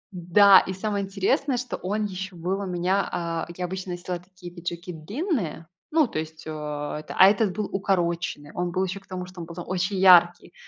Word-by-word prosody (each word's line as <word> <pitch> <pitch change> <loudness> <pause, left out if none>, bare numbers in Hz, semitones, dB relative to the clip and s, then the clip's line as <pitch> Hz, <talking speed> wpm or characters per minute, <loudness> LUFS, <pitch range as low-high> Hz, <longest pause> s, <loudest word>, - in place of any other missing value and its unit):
Да, 190 +3 +7
и 190 - -4
самое 200 +1 -2
интересное, 195 +7 0
что 250 0 -4
он 210 +3 -2
еще 190 -1 -6
был 180 +4 -2
у 200 - -3
меня 180 +2 0
а, 165 -1 -3
я 180 - -2
обычно 185 0 -5
носила 175 0 -4
такие 180 -1 -13
пиджаки 170 0 -6
длинные, 200 - -3 0.2
ну, 310 -4 +3
то 155 - -3
есть, 160 0 -7
э, - - -6
эта 150 0 -5
а 190 - +9
этот 205 -1 +2
был 210 -1 -2
укороченный. 170 -6 -1
Он 175 0 -2
был 185 +2 0
еще 190 +1 -3
к 195 - -26
тому, 180 -1 -5
что 180 0 -12
он - - -6
был 170 - -10
очень 185 +1 -1
яркий. 175 -2 +5
185 Hz, 200 wpm, -25 LUFS, 170-195 Hz, 0.2 s, а